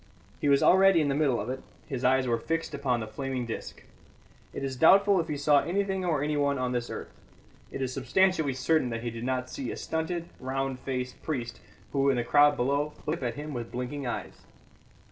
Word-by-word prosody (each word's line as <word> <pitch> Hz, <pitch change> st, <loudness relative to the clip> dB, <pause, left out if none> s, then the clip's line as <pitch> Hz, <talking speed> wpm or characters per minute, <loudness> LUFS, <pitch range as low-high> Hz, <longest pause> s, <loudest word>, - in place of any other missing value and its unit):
He 145 Hz, -, +1 dB
was 140 Hz, -1 st, +4 dB
already 190 Hz, -1 st, +6 dB
in 150 Hz, -2 st, +1 dB
the -, -, +1 dB
middle 140 Hz, -4 st, +2 dB
of 105 Hz, -, -4 dB
it; 130 Hz, 0 st, -5 dB, 0.2 s
his 135 Hz, -4 st, -5 dB
eyes 130 Hz, +1 st, +3 dB
were 120 Hz, -2 st, +1 dB
fixed 165 Hz, +6 st, -2 dB
upon 130 Hz, -4 st, 0 dB
the -, -, -3 dB
flaming 130 Hz, +1 st, -3 dB
disc. 115 Hz, -, -7 dB, 0.7 s
It -, -, -6 dB
is 135 Hz, -1 st, -3 dB
doubtful 195 Hz, +7 st, +6 dB
if 165 Hz, -, -1 dB
he 150 Hz, -3 st, -3 dB
saw 145 Hz, 0 st, +4 dB
anything 190 Hz, +1 st, -1 dB
or 155 Hz, -5 st, 0 dB
anyone 145 Hz, -2 st, +1 dB
on 130 Hz, -1 st, -1 dB
this 120 Hz, -1 st, -2 dB
earth; -, -, -6 dB, 0.6 s
it 135 Hz, -, -3 dB
is 130 Hz, -1 st, -3 dB
substantially 160 Hz, 0 st, +2 dB
certain 130 Hz, +1 st, +1 dB
that 115 Hz, 0 st, -4 dB
he 120 Hz, -, -2 dB
did 115 Hz, 0 st, -7 dB
not 130 Hz, 0 st, -1 dB
see 130 Hz, -3 st, -4 dB
a -, -, -6 dB
stunted, 170 Hz, +1 st, -3 dB
round 135 Hz, 0 st, -2 dB
faced 125 Hz, -1 st, -4 dB
priest 125 Hz, -7 st, -4 dB, 0.3 s
who, 140 Hz, 0 st, +3 dB
in 135 Hz, -, +3 dB
the 120 Hz, -, +1 dB
crowd 145 Hz, +4 st, +5 dB
below, 140 Hz, +4 st, 0 dB
looked 155 Hz, +1 st, -2 dB
up 125 Hz, -, 0 dB
at 115 Hz, -, -7 dB
him 150 Hz, +1 st, -6 dB
with 120 Hz, -2 st, -5 dB
blinking 125 Hz, +2 st, -4 dB
eyes. 120 Hz, -, -5 dB
135 Hz, 215 wpm, -28 LUFS, 125-155 Hz, 0.7 s, already